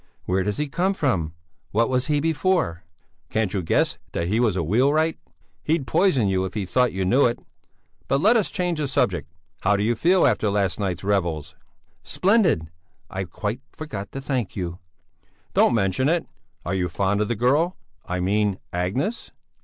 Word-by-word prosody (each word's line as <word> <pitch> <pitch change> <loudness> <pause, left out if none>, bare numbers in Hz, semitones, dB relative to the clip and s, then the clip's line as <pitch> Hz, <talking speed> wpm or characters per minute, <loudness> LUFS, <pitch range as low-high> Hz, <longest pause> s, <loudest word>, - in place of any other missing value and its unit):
"Where 95 +1 +1
does 105 +1 -2
he 150 - -1
come 185 +7 0
from? 90 - 0 0.4
What 115 +3 +2
was 125 -1 +1
he 150 -1 +2
before?" 160 - 0 0.5
"Can't 110 -3 0
you 100 - 0
guess 80 - +1
that 85 +1 -1
he 110 +4 +1
was 115 -6 +2
a 90 - 0
wheelwright? 140 - +2 0.4
He'd 155 -2 0
poison 130 - +3
you 95 -1 +1
if 95 +1 -5
he 105 -3 -1
thought 125 +6 +2
you 95 0 -2
knew 125 +9 +4
it. 120 - -2 0.7
But 135 - +2
let 215 +9 +5
us 220 -4 +2
change 180 -4 -1
the 145 - 0
subject; 90 - 0 0.3
how 100 +1 +2
do 100 - 0
you 115 +3 +2
feel 175 +10 +3
after 110 -5 +2
last 100 -1 0
night's 95 -3 -2
revels?" 85 -7 -1 0.5
"Splendid! 180 - +2 0.4
I 95 0 -3
quite 105 +8 -4
forgot 105 -11 -6
to 135 - -5
thank 130 -6 -2
you!" 90 -2 -4 0.7
"Don't - - +4
mention 100 +6 +1
it! 170 0 +1 0.4
Are 85 - -2
you 90 -2 0
fond 100 +4 0
of 105 - +1
the 120 - -1
girl? 145 - +2 0.3
I 90 +1 -3
mean 100 +1 +1 0.2
Agnes?" 105 - -2
110 Hz, 180 wpm, -24 LUFS, 95-145 Hz, 0.7 s, let